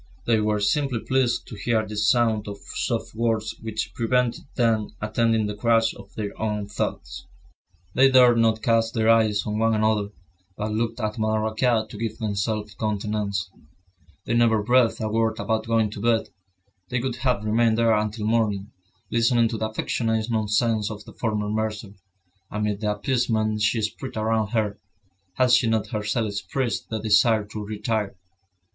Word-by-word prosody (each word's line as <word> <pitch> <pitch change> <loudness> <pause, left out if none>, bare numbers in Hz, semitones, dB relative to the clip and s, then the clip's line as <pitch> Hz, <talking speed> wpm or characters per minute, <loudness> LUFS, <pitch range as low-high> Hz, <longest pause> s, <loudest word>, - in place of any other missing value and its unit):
They 115 -2 +3
were 105 0 +1
simply 135 +3 +1
pleased 130 -2 +1
to - - -9
hear 110 +1 0
this 105 -1 0
sound 115 -4 +2
of 100 0 -6 0.2
soft - - -2
words 110 -1 -1
which 110 -1 -4
prevented 125 0 0
them 110 -3 +1
attending 110 +1 +1
the 105 - -3
crash 115 0 +2
of - - -13
their 105 -2 -3
own 105 -1 -1
thoughts. 105 - -4 0.7
They 135 +1 +5
dared 125 -3 +6
not 110 -1 +2
cast 115 0 +2
their 110 0 +4
eyes 110 -3 +3
on 105 0 -2
one 115 0 +2
another, 110 -1 +1 0.5
but 105 +1 -3
looked 115 +3 -2
at 110 0 -3
Madame 110 0 +1
Raquin 110 0 +1
to 105 - -10
give 115 -1 -3
themselves 105 -1 -2
countenances. 105 -2 -2 0.8
They 115 - -1
never 115 -2 +3
breathed 120 -1 +3
a 110 - -1
word 110 0 0
about 110 -1 -1
going 115 -2 +2
to 105 - -7
bed; 115 0 +1 0.6
they 125 - 0
would 125 0 -3
have 120 -4 0
remained 110 +1 +2
there 115 -1 +4
until 105 0 -1
morning, 110 -2 0 0.4
listening 115 0 +3
to 115 - -3
the 110 - -1
affectionate 110 +1 -1
nonsense 110 0 +1
of 105 -1 -8
the - - -12
former 105 -3 -2
mercer, 105 -1 -3 0.6
amid 105 0 -2
the 105 -1 +1
appeasement 110 -2 0
she 110 +1 +1
spread 120 +4 -4
around 110 0 +1
her, 110 -2 -1 0.6
had 125 +4 +3
she 125 -1 +5
not 110 -1 0
herself 110 0 -1
expressed 115 +5 -3
the 110 - -2
desire 110 0 +3
to 105 0 -7
retire. 105 0 -2
110 Hz, 165 wpm, -24 LUFS, 105-115 Hz, 0.8 s, dared